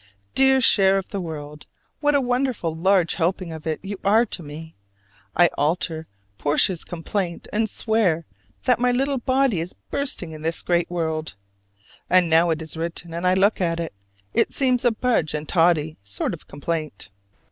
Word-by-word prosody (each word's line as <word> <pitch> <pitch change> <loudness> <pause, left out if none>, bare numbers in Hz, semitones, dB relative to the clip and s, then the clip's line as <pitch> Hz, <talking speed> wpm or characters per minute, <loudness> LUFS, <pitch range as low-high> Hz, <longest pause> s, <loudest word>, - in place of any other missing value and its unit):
Dear 265 0 +5
share 195 -4 +5
of 195 - -4
the 200 - -3
world, 150 -3 -7 0.3
what 295 -1 +2
a 280 - +4
wonderful 245 -9 0
large 180 0 +3
helping 175 0 -1
of 160 0 -8
it 155 - -1
you 200 0 -5
are 220 +4 +4
to 200 - -4
me! 160 +1 -9 0.6
I 175 -1 +5
alter 160 +1 -1 0.3
Portia's 160 +4 +2
complaint 175 +1 -4
and 220 +1 +1
swear 200 -8 +1 0.4
that 250 -2 +3
"my 250 0 +3
little 270 +2 0
body 255 -5 +2
is 170 +3 -4 0.2
bursting 260 - -3
with 155 -1 -9
this 165 +1 -2
great 175 -1 +1
world." 160 - -3 0.7
And 180 -2 +4
now 165 +2 +5
it 160 -1 -1
is 160 - -7
written 165 +1 -5
and 170 +2 -1
I 185 - +4
look 195 +2 +3
at 165 -1 0
it, 165 -1 -4 0.4
it - - +2
seems 255 -2 +1
a 245 - +5
Budge 225 -9 0
and 150 0 -4
Toddy 165 -2 +2
sort 100 -1 -2
of - - -10
complaint. 150 - -4
175 Hz, 175 wpm, -23 LUFS, 160-220 Hz, 0.7 s, Dear